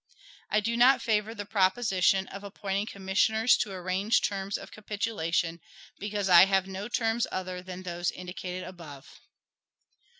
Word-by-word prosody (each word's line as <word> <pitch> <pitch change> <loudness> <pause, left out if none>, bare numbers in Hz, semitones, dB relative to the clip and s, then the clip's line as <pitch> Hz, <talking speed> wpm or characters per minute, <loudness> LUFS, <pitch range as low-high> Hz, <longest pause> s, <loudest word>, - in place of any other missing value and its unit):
I 210 - +2
do 230 +2 -1
not 250 +2 +6
favor 220 -1 0
the 205 -1 -5
proposition 195 -2 +2
of 195 +1 -9
appointing 200 0 -3
commissioners 215 +4 +2
to 205 - -2
arrange 190 +4 0
terms 195 0 -2
of - - -11
capitulation, 175 -6 -2 0.4
because 205 -1 -2
I 175 -1 +9
have 195 -1 +2
no 195 +1 -6
terms 230 -1 0
other 185 -1 -4
than 185 0 -8
those 175 -1 -2
indicated 180 0 -6
above. 165 -7 -11
195 Hz, 140 wpm, -28 LUFS, 185-215 Hz, 0.4 s, I